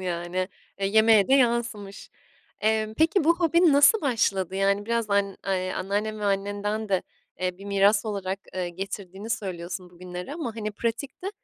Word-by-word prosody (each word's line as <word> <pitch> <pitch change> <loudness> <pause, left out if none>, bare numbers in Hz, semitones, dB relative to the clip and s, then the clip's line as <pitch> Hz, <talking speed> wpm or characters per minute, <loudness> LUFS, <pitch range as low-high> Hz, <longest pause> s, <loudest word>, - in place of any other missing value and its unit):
yani. 180 +1 -2 0.3
E, 195 0 -1
yemeğe 220 0 +5
de 270 - +5
yansımış. 235 -6 0 0.5
Emm, 220 0 +1
peki, 320 - +2
bu 335 +1 +4
hobin 335 0 +4
nasıl 285 +10 +6
başladı? 195 - 0
Yani, 200 +1 +1
biraz 230 -2 -1
an 200 -1 +1
eee, 185 -1 -1
anneannen 210 +3 -2
ve - - -3
annenden 205 +2 -1
de, 190 -2 +1 0.4
eee, 180 0 -2
bir 200 - -11
miras 200 +2 +3
olarak, 195 -2 -3 0.2
eee, 180 -1 -2
getirdiğini 195 +3 -7
söylüyorsun 180 -2 -4
bugünlere 180 - -7
ama, 245 -9 -5
hani, 215 -1 -3
pratikte, 255 - -4
205 Hz, 155 wpm, -26 LUFS, 190-230 Hz, 0.5 s, nasıl